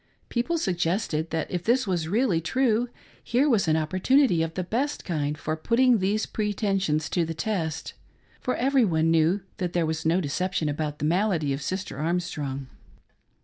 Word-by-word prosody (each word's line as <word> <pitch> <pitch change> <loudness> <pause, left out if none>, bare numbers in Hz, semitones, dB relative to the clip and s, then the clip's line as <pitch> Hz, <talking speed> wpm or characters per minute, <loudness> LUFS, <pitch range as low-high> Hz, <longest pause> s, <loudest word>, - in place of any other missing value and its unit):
People 250 +8 0
suggested 175 - -1
that 160 -1 -2
if 175 -1 -2
this 250 +5 +2
was 175 -5 -1
really 205 -3 +2
true, 240 +4 +1 0.3
here 255 +5 +2
was 225 - +2
an 155 0 +3
opportunity 185 - +3
of 165 0 -2
the 185 - -1
best 260 +10 -2
kind 150 -4 -1
for 155 +1 -2
putting 235 +8 +3
these 200 +3 +1
pretensions 195 -7 0
to 175 - +2
the 165 0 -4
test; 165 -5 -2 0.5
for 255 - -1
every 270 0 +3
one 165 -5 +2
knew 165 +5 +3 0.2
that 180 -2 -2
there 175 -2 +2
was 160 0 -2
no 165 +3 +2
deception 180 +1 -1
about 150 0 -2
the 150 - -2
malady 170 -4 +1
of 135 - -4
Sister' 185 -6 -4
Armstrojig. 150 -5 -2
180 Hz, 170 wpm, -26 LUFS, 160-220 Hz, 0.5 s, an